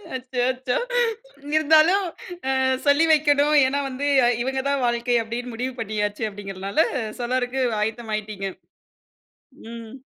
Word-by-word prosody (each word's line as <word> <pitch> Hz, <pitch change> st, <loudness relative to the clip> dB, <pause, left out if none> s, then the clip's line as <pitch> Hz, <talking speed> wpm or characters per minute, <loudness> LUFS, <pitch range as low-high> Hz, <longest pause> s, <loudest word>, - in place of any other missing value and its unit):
அச்சச்சோ! 255 Hz, 0 st, -1 dB, 0.8 s
இருந்தாலும் 315 Hz, +5 st, +5 dB, 0.5 s
அ -, -, +2 dB, 0.3 s
சொல்லி 285 Hz, +3 st, +4 dB
வைக்கணும். 295 Hz, 0 st, +3 dB
ஏன்னா 275 Hz, +2 st, 0 dB
வந்து 270 Hz, +2 st, -3 dB, 0.2 s
அ -, -, +4 dB
இவங்க 265 Hz, +2 st, -1 dB
தான் 280 Hz, -2 st, 0 dB
வாழ்க்கை 240 Hz, 0 st, +1 dB
அப்டின்னு 240 Hz, +2 st, -5 dB
முடிவு 255 Hz, +3 st, -3 dB
பண்ணியாச்சு 210 Hz, 0 st, -2 dB
அப்படிங்கறனால 200 Hz, +5 st, -2 dB, 0.4 s
சொல்லறக்கு 250 Hz, +1 st, -1 dB, 0.2 s
ஆயத்தமாயிட்டீங்க. 215 Hz, -2 st, -3 dB, 1.3 s
ம். 230 Hz, 0 st, -9 dB
250 Hz, 105 wpm, -23 LUFS, 225-280 Hz, 1.3 s, இருந்தாலும்